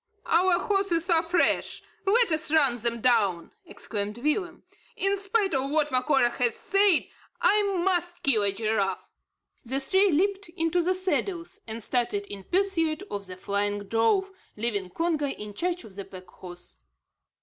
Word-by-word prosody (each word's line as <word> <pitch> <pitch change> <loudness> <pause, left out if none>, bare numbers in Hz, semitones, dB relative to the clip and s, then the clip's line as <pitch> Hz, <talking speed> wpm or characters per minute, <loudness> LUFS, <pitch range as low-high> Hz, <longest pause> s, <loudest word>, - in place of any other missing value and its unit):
"Our 355 +1 +3
horses 380 -3 +1
are 330 -1 +5
fresh. 340 +1 0 0.2
Let 460 0 +4
us 315 -1 0
run 280 -6 +3
them 235 0 -2
down," 205 -9 +1 0.2
exclaimed 210 -6 -5
Willem. 340 +7 -2 0.3
"In 390 +1 +2
spite 395 -1 0
of 270 0 0
what 300 -1 +1
Macora 255 -1 +2
has 240 -1 0
said, 395 -4 +3 0.4
I 420 +1 +4 0.2
must 350 -2 -1
kill 245 -6 +3
a 200 -1 +2
giraffe!" 210 -1 -2 0.5
The 265 +2 0
three 380 +8 +4
leaped 390 +4 0
into 330 +2 +1
the 365 +2 0
saddles, 370 +1 -2
and 225 0 -5
started 235 -5 -1
in 200 -1 -9
pursuit 360 -3 0
of 200 -1 -5
the 185 0 -9
flying 205 +1 -2
drove, 230 - +1 0.3
leaving 210 -4 -2
Congo 320 - -1
in 210 -6 -6
charge 355 - -2
of 200 -3 -13
the 200 - -6
pack 185 -1 -12
horse. 175 -1 -13
295 Hz, 155 wpm, -26 LUFS, 215-360 Hz, 0.5 s, are